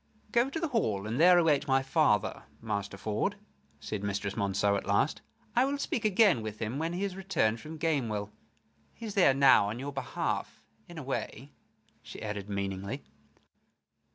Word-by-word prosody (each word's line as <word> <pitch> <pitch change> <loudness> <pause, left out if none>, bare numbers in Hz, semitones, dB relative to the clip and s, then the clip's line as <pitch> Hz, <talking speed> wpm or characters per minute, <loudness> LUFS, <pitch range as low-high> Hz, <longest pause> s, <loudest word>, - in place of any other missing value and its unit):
"Go 240 +4 +3
to 325 - -3
the 330 -1 -1
hall, 110 - 0
and 115 +5 -2
there 180 +2 +7
await 160 -5 +3
my 135 0 +3
father, 130 - +1
Master 100 -3 -4
Ford," 110 - -1 0.4
said 105 -2 -4
Mistress 100 -1 -2
Monceux, 100 -1 +1
at 100 - -3
last. 100 +9 +1 0.3
"I 245 - +5
will 280 +2 0
speak 235 -5 -2
again 200 - +4
with 110 -1 -5
him 115 +5 -3
when 165 +2 -2
he 180 +3 -2
has 195 -2 -2
returned 150 - 0
from 160 +5 -8
Gamewell. 120 -11 -1 0.6
He 230 - -8
is 210 - -5
there 180 -9 +5
now 135 -7 +6
on 110 - -4
your 140 +3 -5
behalf, 135 - -3 0.2
in 170 - -10
a 155 - -5
way," 135 +1 -4 0.5
she - - -10
added, 105 -2 -5
meaningly. 100 -1 -3
135 Hz, 175 wpm, -30 LUFS, -, 0.6 s, there